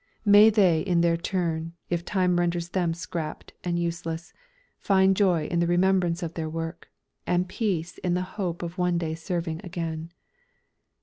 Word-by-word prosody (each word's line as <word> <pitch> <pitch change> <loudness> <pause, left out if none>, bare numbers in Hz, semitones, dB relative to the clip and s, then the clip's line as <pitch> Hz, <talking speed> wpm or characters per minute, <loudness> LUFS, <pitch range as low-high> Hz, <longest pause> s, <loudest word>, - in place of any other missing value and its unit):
May 205 +1 +8
they 190 -7 +4
in 175 -3 +2
their 170 -1 +3
turn, 165 -2 -2 0.2
if 170 -1 0
time 180 -1 +1
renders 170 0 -1
them 175 -3 0
"scrapped" 165 -2 -6
and 175 -1 -1
useless, 170 -1 -3 0.5
find 190 -1 +4
joy 180 -6 +2
in 170 +2 -1
the 170 - +2
remembrance 175 0 +2
of 165 -1 -4
their 160 -2 -3
work, 165 +1 -5 0.4
and 180 +1 +1
peace 180 -5 -2
in 180 -1 0
the 180 - 0 0.2
hope 175 -2 -2
of 170 +2 -6
one 180 -1 +2
day 165 -2 -2
serving 165 0 -3
again. 165 -2 -5
175 Hz, 165 wpm, -26 LUFS, 165-180 Hz, 0.5 s, May